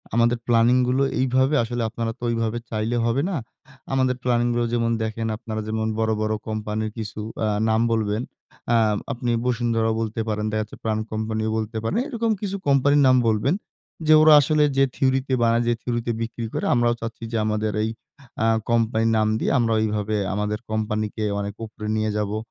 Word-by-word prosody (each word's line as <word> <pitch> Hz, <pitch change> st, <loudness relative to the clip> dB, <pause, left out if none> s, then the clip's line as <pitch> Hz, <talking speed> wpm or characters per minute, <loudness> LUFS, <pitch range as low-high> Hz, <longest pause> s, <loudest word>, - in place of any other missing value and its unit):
আমাদের 120 Hz, +1 st, +3 dB
প্ল্যানিং 120 Hz, +1 st, +4 dB
গুলো 130 Hz, +2 st, +2 dB, 0.2 s
এইভাবে 130 Hz, +3 st, +2 dB
আসলে 120 Hz, +1 st, -3 dB
আপনারা 115 Hz, 0 st, -3 dB
তো -, -, -11 dB
এইভাবে 115 Hz, 0 st, -1 dB
চাইলে 110 Hz, +2 st, -1 dB
হবে 120 Hz, +4 st, +1 dB
না। 185 Hz, -, -2 dB, 0.6 s
আমাদের 130 Hz, -1 st, +2 dB
প্ল্যানিং 120 Hz, -1 st, +2 dB
গুলো 120 Hz, 0 st, +1 dB
যেমন 115 Hz, -1 st, +1 dB
দেখেন, 115 Hz, +1 st, -3 dB
আপনারা 110 Hz, -1 st, -5 dB
যেমন 110 Hz, 0 st, -1 dB
বড়, 110 Hz, 0 st, +1 dB
বড় 110 Hz, 0 st, 0 dB
কোম্পানির 110 Hz, 0 st, -3 dB
কিছু 110 Hz, -1 st, -5 dB, 0.3 s
আ -, -, +1 dB, 0.2 s
নাম 110 Hz, +1 st, +2 dB
বলবেন, 110 Hz, 0 st, 0 dB, 0.5 s
আ -, -, +5 dB, 0.4 s
আপনি 120 Hz, 0 st, -2 dB
বসুন্ধরাও 115 Hz, -2 st, +1 dB
বলতে 110 Hz, 0 st, -2 dB
পারেন। 105 Hz, 0 st, -1 dB
দেখা 110 Hz, 0 st, 0 dB
যাচ্ছে 105 Hz, -, -8 dB
প্রাণ 110 Hz, -1 st, 0 dB
কোম্পানিও 110 Hz, 0 st, -2 dB
বলতে 110 Hz, 0 st, -3 dB
পারেন। 155 Hz, -, -1 dB
এরকম 230 Hz, -4 st, -1 dB
কিছু 200 Hz, -1 st, -3 dB
কোম্পানির 140 Hz, +1 st, +4 dB
নাম 130 Hz, -, +6 dB
বলবেন। 110 Hz, +8 st, +2 dB, 0.5 s
যে 155 Hz, -, +7 dB
ওরা 155 Hz, 0 st, +8 dB
আসলে 150 Hz, +2 st, +2 dB
যে 135 Hz, -, +5 dB
থিওরিতে 130 Hz, 0 st, +1 dB
বানায়, 115 Hz, +1 st, +3 dB
যে 120 Hz, -, +3 dB
থিওরিতে 120 Hz, -1 st, -2 dB
বিক্রি 115 Hz, 0 st, -4 dB
করে, -, -, -2 dB
আমরাও 120 Hz, -1 st, +3 dB
চাচ্ছি 115 Hz, 0 st, -6 dB
যে 115 Hz, -, -1 dB
আমাদের 110 Hz, 0 st, 0 dB
এই 110 Hz, -, 0 dB, 0.5 s
আ -, -, +3 dB, 0.2 s
কোম্পানির 115 Hz, -1 st, +2 dB
নাম 110 Hz, 0 st, +2 dB
দিয়ে -, -, 0 dB
আমরা 115 Hz, -1 st, +2 dB
এইভাবে 105 Hz, 0 st, -1 dB, 0.2 s
আমাদের 105 Hz, +1 st, -2 dB
কোম্পানিকে 110 Hz, 0 st, -2 dB, 0.2 s
অনেক 100 Hz, 0 st, -3 dB
উপরে 105 Hz, 0 st, -8 dB
নিয়ে 110 Hz, 0 st, 0 dB
যাবো। 105 Hz, +1 st, -2 dB
115 Hz, 180 wpm, -23 LUFS, 110-120 Hz, 0.6 s, ওরা